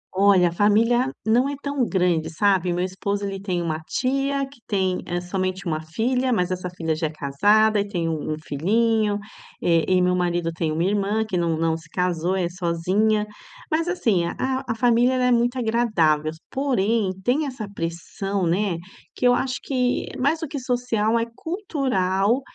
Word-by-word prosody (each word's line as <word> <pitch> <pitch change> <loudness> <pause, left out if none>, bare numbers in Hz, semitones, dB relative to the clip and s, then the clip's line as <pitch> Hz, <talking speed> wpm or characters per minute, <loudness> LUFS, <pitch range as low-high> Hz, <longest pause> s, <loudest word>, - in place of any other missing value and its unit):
Olha, 190 -2 +5
a - - -7
família 225 +7 +3 0.2
não 240 +5 +3
é 285 - -3
tão 280 -2 0
grande, 180 -4 +1
sabe, 185 0 +2
meu 175 +1 0
esposo 200 +2 -3
ele 195 -1 -4
tem 180 -3 -2
uma 160 -2 -2
tia 275 - -1
que 275 -1 -18
tem, 190 -3 0
eh, 175 0 -1
somente 185 +1 -3
uma 155 -2 -1
filha, 250 +11 0
mas 185 -5 +1
essa 180 0 -3
filha 165 -3 -2
já 160 0 -1
é - - -5
casada 205 +10 +3
e 200 - -1
tem 175 -5 -2
um 155 -1 -2
um - - -2
filhinho, 210 +7 +1 0.5
eh, 165 -2 +3
e 185 -1 +3
meu 180 0 +2
marido 175 -2 0
tem 160 -1 -1
uma 160 +2 0
irmã 205 +3 +1
que 205 - -3
não 170 -2 +1
não 165 0 +1
se 160 -2 -11
casou, 180 0 0
é 185 -2 0
sozinha, 185 +5 0 0.5
mas 325 +2 +1
assim, 225 - +1
a 260 +8 -2
a 225 - -1
família 245 +1 +3
ela 255 -1 +1
é 250 - +3
muito 240 +1 +2
agradável, 215 -11 +2
s 160 +1 -9
porém 230 -7 +1
tem 275 +7 +1
essa 250 -6 -6
pressão, 185 +3 -3
né, 180 +1 +1 0.4
que - - -2
eu 245 - +6
que - - +2
acho 255 -1 -2
que 250 -2 0
mais 285 +5 +2
do 320 - -3
que 285 0 -5
social, 240 -3 0
é 230 - +1
cultural 255 - 0
200 Hz, 190 wpm, -23 LUFS, 175-245 Hz, 0.5 s, eu